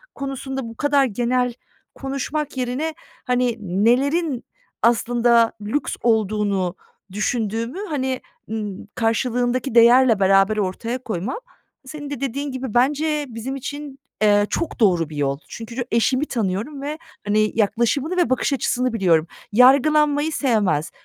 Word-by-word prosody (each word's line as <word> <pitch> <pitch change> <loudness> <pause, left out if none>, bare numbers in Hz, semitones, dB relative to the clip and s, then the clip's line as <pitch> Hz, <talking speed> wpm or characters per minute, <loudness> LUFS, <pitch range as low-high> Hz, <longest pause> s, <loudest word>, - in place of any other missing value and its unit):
konusunda 270 -1 -4
bu 230 -1 -8
kadar 285 -1 +3
genel 245 +2 0 0.4
konuşmak 275 +2 -4
yerine, 260 +6 -2 0.3
hani, 250 -2 +1
nelerin 250 - +1 0.4
aslında 235 0 +3
lüks 220 +8 -2
olduğunu 210 -5 +1 0.4
düşündüğümü, 225 - -2
hani, 265 -4 -2 0.3
ııı, 210 -3 -5
karşılığındaki 245 +2 0
değerle 235 -1 +6
beraber 195 +2 +4
ortaya 215 +5 -2
koymam, 215 - -3 0.5
senin 290 +1 -7
de 285 - -5
dediğin 275 +2 -3
gibi 260 -3 -5
bence 295 +4 +1
bizim 235 +3 -5
için, 285 +1 -7 0.2
eee, 205 -1 +4
çok 335 - -3
doğru 175 -8 +3
bir 155 - -9
yol. 140 -1 0
Çünkü 230 0 -8
ço 245 - -1
eşimi 255 +5 +2
tanıyorum 230 +4 -3
ve, 295 +2 -4 0.3
hani, 215 +1 +2
yaklaşımını 240 - +1
ve 350 -9 +2
bakış 260 +2 +1
açısını 255 -2 0
biliyorum. 175 -7 +2 0.2
Yargılanmayı 290 +5 +4
sevmez, 215 - +1
245 Hz, 125 wpm, -21 LUFS, 215-275 Hz, 0.5 s, değerle